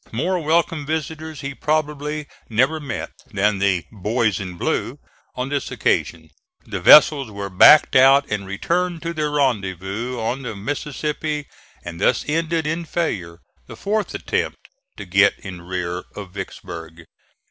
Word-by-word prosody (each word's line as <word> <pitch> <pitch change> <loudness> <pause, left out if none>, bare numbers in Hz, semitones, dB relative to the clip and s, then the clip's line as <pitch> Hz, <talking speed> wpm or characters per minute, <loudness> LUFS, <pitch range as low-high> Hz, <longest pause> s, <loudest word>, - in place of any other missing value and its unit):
More 175 +11 0
welcome 160 -1 +1
visitors 160 0 -4
he 140 +1 -4
probably 150 0 -2 0.2
never 130 +8 +2
met 135 -7 -5 0.2
than 105 0 +1
the 95 -4 +1
"boys 110 +1 0
in 90 -3 -6
blue" - - -1 0.4
on 125 +1 -3
this 145 -1 -2
occasion. 80 -2 -1 0.3
The 100 -3 -4
vessels 140 - +7
were 100 -1 -6
backed 150 +11 +7
out 135 +2 +6
and 105 -2 -3
returned 170 - -1
to 170 0 -3
their 155 -2 -1
rendezvous 115 - -1
on 120 +4 -2
the 120 -5 -5
Mississippi; 150 +5 -3 0.4
and 85 +1 -7
thus - - +2
ended 165 +1 0
in 165 +3 -2
failure 95 - -3 0.3
the - - -9
fourth 210 +1 -2
attempt - - -2 0.4
to - - -7
get 95 +3 +4
in 90 -3 -9
rear 90 0 -4
of 100 -3 -8
Vicksburg. 85 -3 -8
130 Hz, 145 wpm, -21 LUFS, 100-155 Hz, 0.4 s, vessels